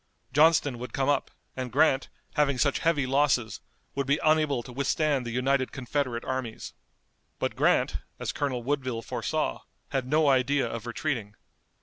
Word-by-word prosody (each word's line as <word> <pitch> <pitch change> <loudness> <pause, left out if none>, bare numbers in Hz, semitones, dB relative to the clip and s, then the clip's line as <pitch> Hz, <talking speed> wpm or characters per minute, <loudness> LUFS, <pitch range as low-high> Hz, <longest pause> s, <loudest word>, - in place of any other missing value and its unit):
Johnston 145 -4 +4
would 125 - -7
come 135 0 +1
up, 145 -2 +1 0.3
and 130 -2 -4
Grant, 140 0 +3 0.2
having 145 -3 +2
such 140 +2 +2
heavy 160 -5 +2
losses, 130 -4 +1 0.3
would 140 -1 -2
be 140 +2 +2
unable 155 -5 +3
to 125 - -10
withstand 140 0 0
the - - -3
united 130 +2 +1
Confederate 130 -2 -2
armies. 130 -4 -4 0.6
But - - -2
Grant, - - +2 0.2
as - - -3
Colonel 140 -5 -2
Woodville 130 -4 -2
foresaw, 130 +7 -2 0.3
had 135 -2 -2
no 155 +2 +3
idea 135 +1 +3
of 115 0 -5
retreating. 115 -4 -3
135 Hz, 150 wpm, -28 LUFS, 125-145 Hz, 0.6 s, Johnston